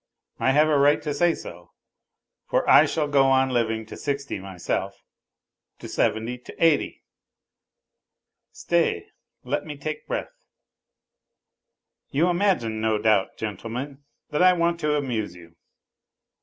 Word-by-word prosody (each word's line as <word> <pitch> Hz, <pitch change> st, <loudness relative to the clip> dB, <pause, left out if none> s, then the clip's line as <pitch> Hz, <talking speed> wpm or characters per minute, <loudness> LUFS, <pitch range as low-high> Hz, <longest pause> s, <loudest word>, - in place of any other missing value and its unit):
I -, -, +2 dB
have 150 Hz, +2 st, +4 dB
a 150 Hz, -2 st, +3 dB
right 145 Hz, +1 st, +4 dB
to 150 Hz, -, -2 dB
say 170 Hz, +3 st, +2 dB
so, 85 Hz, 0 st, -11 dB, 0.7 s
for -, -, 0 dB
I -, -, +7 dB
shall 155 Hz, -2 st, -1 dB
go 140 Hz, -2 st, +3 dB
on 135 Hz, 0 st, +3 dB
living 115 Hz, -2 st, 0 dB
to -, -, -10 dB
sixty 140 Hz, -5 st, -3 dB
myself. 95 Hz, -2 st, -4 dB, 0.7 s
To -, -, -9 dB
seventy! 115 Hz, +3 st, -1 dB
To -, -, -12 dB
eighty!... 165 Hz, -3 st, +1 dB, 1.5 s
Stay, -, -, 0 dB, 0.3 s
let 135 Hz, +4 st, -2 dB
me 150 Hz, -2 st, -8 dB
take 155 Hz, +2 st, -6 dB
breath.... -, -, -6 dB, 1.6 s
You 160 Hz, +6 st, +2 dB
imagine 175 Hz, -, 0 dB
no 110 Hz, -1 st, +1 dB
doubt, 105 Hz, -2 st, +1 dB
gentlemen, 120 Hz, +6 st, -5 dB, 0.3 s
that 150 Hz, -, 0 dB
I 185 Hz, 0 st, +7 dB
want 170 Hz, -1 st, 0 dB
to 150 Hz, -2 st, +1 dB
amuse 115 Hz, -10 st, -3 dB
you. 85 Hz, -1 st, -15 dB
135 Hz, 130 wpm, -24 LUFS, 110-150 Hz, 1.6 s, I